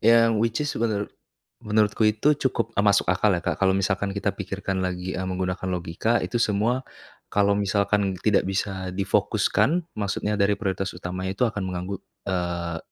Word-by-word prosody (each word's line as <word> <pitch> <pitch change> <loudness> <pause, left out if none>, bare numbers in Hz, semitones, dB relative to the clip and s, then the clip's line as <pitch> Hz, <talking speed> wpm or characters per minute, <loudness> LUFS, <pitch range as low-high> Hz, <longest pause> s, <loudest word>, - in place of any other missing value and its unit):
Yang 115 +1 +6
which 115 0 +1
is 145 - -1
menurut 110 -3 0 0.6
menurutku 105 0 +2
itu 110 +8 +3
cukup, 115 -5 0
e - - +5
masuk 100 -1 +4
akal 95 +2 +3
ya 85 - -1
Kak, - - -1
kalau 95 -1 +3
misalkan 95 +1 0
kita 100 - 0
pikirkan 95 -1 -3
lagi, 90 0 -3
e - - -2
menggunakan 90 0 -2
logika, 90 +6 0
itu 90 +6 -1
semua, 115 +4 +1 0.5
kalau 100 0 +3
misalkan 100 0 +1
tidak 105 -1 +3
bisa 95 -1 -2
difokuskan, 105 - +2 0.2
maksudnya 105 0 -1
dari 100 0 +3
prioritas 95 -2 -2
utamanya 90 +2 -4
itu 95 - 0
akan 105 -3 -4
menganggu, 90 +1 -3 0.3
eee 85 -2 -2
100 Hz, 165 wpm, -25 LUFS, 95-105 Hz, 0.6 s, Yang